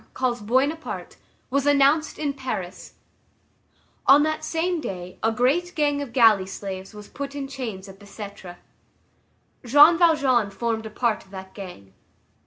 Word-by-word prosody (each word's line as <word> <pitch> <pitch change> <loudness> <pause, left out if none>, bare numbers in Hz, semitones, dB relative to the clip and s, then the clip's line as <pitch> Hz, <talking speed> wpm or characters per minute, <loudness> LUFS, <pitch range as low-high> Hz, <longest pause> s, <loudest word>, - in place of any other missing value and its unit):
calls 245 -3 -1
Buona 260 +8 +1
Parte, 320 - -8 0.3
was 280 +1 +1
announced 290 +2 +3
in 290 -2 -2
Paris; 250 -9 -6 1.1
on 285 +2 +7
that 310 0 -2
same 335 +1 -1
day 180 -6 -7
a 225 - +2
great 295 - 0
gang 290 -2 +1
of 280 -4 -6
galley 225 -6 +4
slaves 190 -1 -7
was 210 -1 -10
put 280 0 -7
in 280 -1 -4
chains 230 -8 -6
at 195 0 -13
Bicêtre. 200 -3 -10 1.1
Jean 295 +7 +6
Valjean 275 - +3
formed 220 +2 -3
a - - -8
part 225 0 -1
of 190 - -24
that 190 -1 -10
gang. 175 - -10
245 Hz, 150 wpm, -24 LUFS, 200-285 Hz, 1.1 s, on